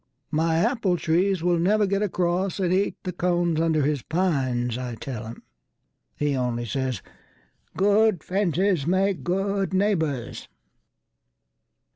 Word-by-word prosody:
My 160 +1 +1
apple 195 -1 +1
trees 175 +2 +1
will 175 -1 +2
never 205 +5 +3
get 200 +1 0
acrossAnd 180 -1 0
eat 195 +2 +1
the 180 - -4
cones 175 -2 +1
under 160 -2 +2
his 145 -1 0
pines, 130 -9 0
I 125 -1 -4
tell 115 -2 -6
him. 115 - -10 0.7
He 145 -1 0
only 120 -2 -1
says, 130 -3 -3 0.7
"Good 205 -2 +3
fences 185 -4 0
make 190 +1 +1
good 195 +1 -1
neighbours." 160 - -1
175 Hz, 120 wpm, -25 LUFS, 145-195 Hz, 0.7 s, never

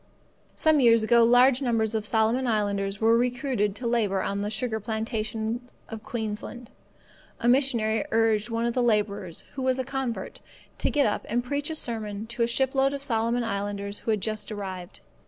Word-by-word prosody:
Some 315 -2 +3
years 230 -3 +5
ago 235 +1 +5
large 245 +3 +5
numbers 225 -4 0
of 215 -1 -2
Solomon 225 +4 +1
islanders 200 -3 -1
were 225 +1 +4
recruited 245 -4 0
to 245 - -7
labour 215 -5 +1
on 200 0 -2
the 205 - -2
sugar 220 0 -2
plantations 220 +2 -3 0.2
of 225 -2 -7
Queensland. 230 -1 -6 0.7
A 235 - -1
missionary 235 -5 +2
urged 225 -1 +2
one 230 0 -1
of 235 - 0
the 250 - +1
labourers, 205 -6 0
who 270 - -5
was 260 0 +1
a 260 - -1
convert, 265 -2 -4 0.4
to - - +1
get 290 -2 +2
up 210 - -1
and 240 +2 0
preach 285 +4 -2
a 320 - -3
sermon 220 -6 0
to 235 0 -3
a 230 - +3
shipload 270 +3 +1
of 280 - -4
Solomon 235 -1 0
islanders 200 -1 -2
who - - -6
had 215 -3 +1
just 215 0 -3
arrived. 190 -3 -7
225 Hz, 180 wpm, -26 LUFS, 210-245 Hz, 0.7 s, years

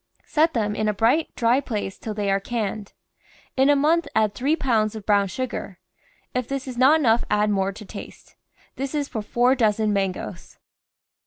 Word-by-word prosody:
Set 320 0 +2
them 210 -2 0
in 215 - -1
a 210 - 0
bright, 235 +10 +2
dry 235 +2 +3
place 210 -7 -4
till 215 -2 -5
they 205 -1 0
are 195 - +2
canned. 210 -1 -4 0.6
In 270 +1 +4
a 290 - +6
month 315 +4 +2
add 215 -2 +2
three 275 +8 +1
pounds 225 -8 0
of 215 -2 -8
brown 200 -1 +3
sugar. 220 -2 -5 0.6
If 250 -1 -2
this 275 -1 -4
is 255 - -5
not 270 +6 +5
enough 235 -5 +3
add 210 0 +2
more 195 -1 +1
to 210 +2 -11
taste. 200 - -11 0.4
This 275 +2 -3
is 290 -2 -1
for 225 -6 -4
four 245 +4 +2
dozen 215 -4 +1
mangoes. 195 -2 -3
225 Hz, 185 wpm, -23 LUFS, 205-265 Hz, 0.6 s, a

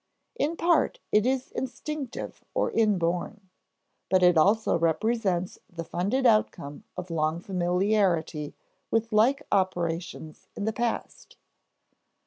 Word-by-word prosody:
In 315 +4 -1
part 345 +8 +2
it 210 +3 +4
is 260 0 -1
instinctive 265 +1 -5
or - - +1
inborn; 195 -1 0 0.6
but 185 0 +3
it 180 -1 +6
also 205 +8 +3
represents 180 +2 0
the 170 -1 -5
funded 205 +11 -1
outcome 110 +7 +1
of 180 -1 -6
long 160 0 0
familiarity 180 -4 0 0.3
with 225 0 0
like 255 +7 +4
operations 175 -4 -2
in 205 - -3
the 220 - 0
past. 235 +1 -4
190 Hz, 115 wpm, -27 LUFS, 170-225 Hz, 0.6 s, it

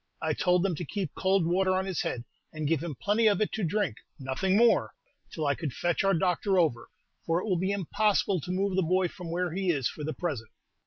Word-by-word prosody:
I 160 -1 0
told 180 +3 +2
them 195 -2 +1
to - - -4
keep 185 -1 -3
cold 190 -2 +2
water 185 +2 +2
on 190 0 0
his 190 -4 -2
head, 120 - -3 0.3
and 155 -1 -3
give 160 -1 +1
him 165 -4 -4
plenty 215 +3 +2
of 205 -3 +3
it 215 - 0
to 220 - -3
drink, 175 - 0 0.2
nothing 140 +9 0
more, 235 +1 +3 0.4
till 155 - -3
I 140 - +3
could 145 -4 -4
fetch 175 +1 0
our 195 -1 +3
doctor 185 +3 +1
over, 150 -10 +1 0.4
for 165 +1 +1
it - - -5
will 185 -5 +1
be 190 +2 0
impossible 200 -1 +1
to 180 - -5
move 190 +1 0
the 190 - +3
boy 180 +1 +1
from 175 0 -9
where 175 0 -1
he 190 0 -1
is 140 -7 +1
for 150 - -7
the 155 +1 -3
present." 130 -11 -3
180 Hz, 235 wpm, -28 LUFS, 160-195 Hz, 0.4 s, of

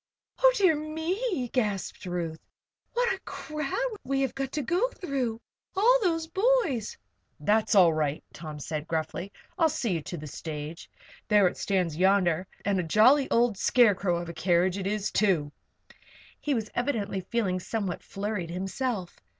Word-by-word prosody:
"Oh, - - +7
dear 370 -6 +5
me!" 320 - -2
gasped 210 -7 -2
Ruth. 170 -2 -3
"See - - -43 0.4
what 480 -2 +2
a 385 - -6
crowd 315 - -3
we 270 +1 0
have 270 - 0
got 270 -1 -3
to 300 - -1
go 360 - +1
through. 270 - -3 0.4
All 480 +6 +5
those 330 -5 +1
boys!" 380 - +1 0.4
"That's 210 +8 +2
all 175 -4 +7
right," 150 -1 -1
Tom 155 -3 -8
said, 150 +1 -4
gruffly. 165 +4 -3 0.3
"I'll 325 - +5
see 245 -9 -1
you 165 - -1
to 175 - -6
the 155 - -8
stage. 150 +2 -7 0.4
There 210 -2 +5
it - - -2
stands 180 -6 0
yonder 185 -2 +3 0.2
and 200 -2 +2
a - - 0
jolly 250 - +5
old 230 -4 +2
scarecrow 200 -7 +4
of 175 0 -5
a 170 - -6
carriage 180 +2 +2
it 190 - -2
is, 210 0 -1
too!" 175 -9 +2 0.9
He 290 -2 0
was 220 -2 -3
evidently 215 -7 -1
feeling 190 -3 -1
somewhat 195 -1 -3
flurried 200 -4 -4
himself. 195 +2 -3
210 Hz, 160 wpm, -28 LUFS, 175-290 Hz, 0.9 s, Oh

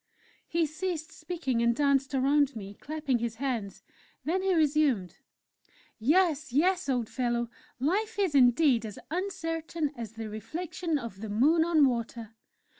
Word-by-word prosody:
He 335 -1 +1
ceased 315 +1 -4
speaking, 315 -8 -2
and 235 0 +3
danced 275 0 +2
around 280 +1 +3
me, 200 -2 -7
clapping 290 0 -2
his 230 -1 -3
hands. 235 -6 -3 0.4
Then 360 +4 +1
he 380 -1 +2
resumed: 290 - +2 0.8
"Yes, 310 +3 +2
yes, 350 +4 +2
old 245 -4 0
fellow! 240 -1 -1 0.3
life 410 - 0
is, 385 -6 +1
indeed, 250 -1 +5
as 210 -3 -7
uncertain 330 -4 -2
as 225 -2 -7
the 225 -1 -6
reflection 320 - -3
of 230 -7 -7
the 220 - -5
Moon 295 +10 +4
on 325 -3 +4
water. 235 -3 -2
280 Hz, 140 wpm, -29 LUFS, 235-330 Hz, 0.8 s, indeed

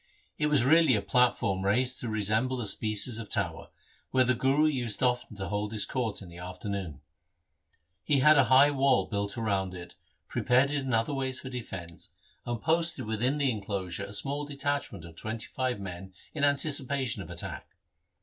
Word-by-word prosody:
It 150 - +2
was 145 -5 +3
really 160 -2 +5
a 105 - 0
platform 110 -6 +1
raised 125 +6 +1
to 120 - -3
resemble 110 +4 0
a 120 - -2
species 110 +3 +2
of 110 - -7
tower, 90 -7 -2 0.4
where 130 -1 +3
the 130 +1 +2
Guru 135 +5 +2
used 125 -7 -1
often 125 -4 0
to 95 0 -5
hold 105 0 -2
his 110 -2 +1
court 115 -6 -3
in 90 - -11
the 85 0 -12
afternoon. 90 -4 -6 1.0
He 145 - +2
had 150 +2 +7
a 140 -3 +5
high 135 +4 +6
wall 135 -2 +2
built 100 +2 -3
round 100 -5 -1
it, 85 -1 -9 0.3
prepared 130 +3 +2
it 145 - 0
in 130 - -2
other 115 +5 0
ways 130 -1 -2
for 130 - -8
defence, 95 -9 -8 0.4
and 120 -1 -2
posted 165 -3 0
within 115 +6 0
the 140 -3 +2
enclosure 100 -3 -3
a 100 - -10
small 140 +8 -1
detachment 140 - -3
of 85 -1 -13
twenty 110 +3 -5
five 130 -4 -2
men 95 -1 -8 0.2
in 150 - -3
anticipation 140 -5 +2
of 85 - -9
attack. 85 -1 -6
120 Hz, 180 wpm, -29 LUFS, 100-135 Hz, 1.0 s, had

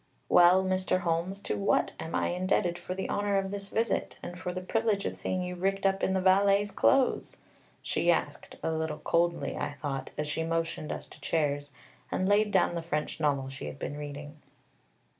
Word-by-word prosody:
"Well, 180 +2 +7
Mr. 185 0 0
Holmes, 175 +3 -1
to - - -2
what 200 - +2
am 160 - -4
I - - +1
indebted 180 -1 0
for 180 +1 -5
the 190 - -3
honor 205 -1 0
of 195 0 -1
this 200 -1 -5
visit, 230 +1 -1
and 175 - -6
for 180 -1 -3
the 185 - -4
privilege 210 +2 0
of - - -2
seeing 185 -1 -2
you 180 0 -4
rigged 195 +2 -1
up 195 0 +2
in 190 - +1
the 190 - +2
valet's 200 +2 +4
clothes?" 270 +4 +2 0.5
she - - 0
asked, - - -1
a - - 0
little 160 -1 -2
coldly, 170 +1 0
I - - -3
thought, 135 -2 -4
as 150 - -2
she 155 +2 -1
motioned 165 -1 -2
us - - -6
to - - -15
chairs, 145 -2 -1 0.4
and 185 - 0
laid 210 +1 +4
down 190 - +3
the 170 - -2
French 155 -2 -3
novel 140 -3 +1
she 135 - -7
had - - -7
been 145 - -4
reading. 145 +1 -7
180 Hz, 195 wpm, -29 LUFS, 155-195 Hz, 0.5 s, Well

